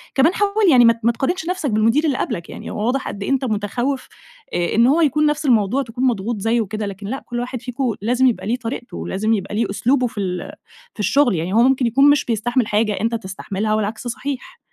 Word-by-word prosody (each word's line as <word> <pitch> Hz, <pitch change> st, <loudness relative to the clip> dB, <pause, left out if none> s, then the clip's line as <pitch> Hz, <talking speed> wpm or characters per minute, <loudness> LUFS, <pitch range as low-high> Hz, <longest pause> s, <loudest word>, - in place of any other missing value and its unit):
كمان 285 Hz, +6 st, +4 dB
حاول 410 Hz, 0 st, +2 dB
يعني 245 Hz, -3 st, +7 dB
ما 230 Hz, -, +6 dB
ت 230 Hz, -, -18 dB
ما 235 Hz, -, +4 dB
تقارنش 320 Hz, +9 st, -2 dB
نفسك 365 Hz, -6 st, -1 dB
بالمدير 225 Hz, +7 st, +2 dB
اللي 280 Hz, -5 st, +1 dB
قبلك 170 Hz, -1 st, -3 dB
يعني، -, -, -8 dB
هوّ 210 Hz, -, -3 dB
واضح 260 Hz, +3 st, 0 dB
قد 200 Hz, -, -5 dB
إيه -, -, -3 dB
أنتَ 270 Hz, -1 st, +1 dB
متخوف، 240 Hz, +5 st, -2 dB, 0.5 s
آآ 175 Hz, -1 st, 0 dB
إن 230 Hz, +2 st, +5 dB
هوّ 305 Hz, +6 st, +3 dB
يكون 300 Hz, 0 st, +3 dB
نفس 300 Hz, 0 st, 0 dB
الموضوع 240 Hz, +1 st, +2 dB
تكون 245 Hz, +1 st, -5 dB
مضغوط 225 Hz, -1 st, -1 dB
زيُّه 225 Hz, +3 st, +1 dB
وكده، 215 Hz, 0 st, -4 dB
لكن 200 Hz, 0 st, -7 dB
لأ، 265 Hz, +5 st, -4 dB
كل 240 Hz, -1 st, -4 dB
واحد 250 Hz, 0 st, -4 dB
فيكم 250 Hz, -1 st, -2 dB
لازم 245 Hz, +4 st, +2 dB
يبقى 235 Hz, -5 st, -1 dB
ليه 230 Hz, -, +1 dB
طريقته، 240 Hz, 0 st, -6 dB
لازم 215 Hz, +4 st, 0 dB
يبقى 200 Hz, -1 st, -3 dB
ليه 225 Hz, +2 st, +1 dB
أسلوبه 250 Hz, +5 st, +1 dB
في 220 Hz, -, -8 dB
ال 180 Hz, -2 st, -4 dB, 0.4 s
في -, -, -23 dB
الشغل، 245 Hz, +1 st, +3 dB
يعني 170 Hz, +3 st, -2 dB
هوّ 225 Hz, -, +5 dB
ممكن 260 Hz, -1 st, +3 dB
يكون 275 Hz, +5 st, +5 dB
مش 290 Hz, -1 st, +3 dB
بيستحمل 240 Hz, +1 st, 0 dB
حاجة 210 Hz, 0 st, +1 dB
أنتَ 230 Hz, +1 st, 0 dB
تستحملها 200 Hz, +1 st, -3 dB
والعكس 215 Hz, +2 st, -2 dB
صحيح. 265 Hz, +3 st, -5 dB
235 Hz, 230 wpm, -20 LUFS, 215-265 Hz, 0.5 s, يعني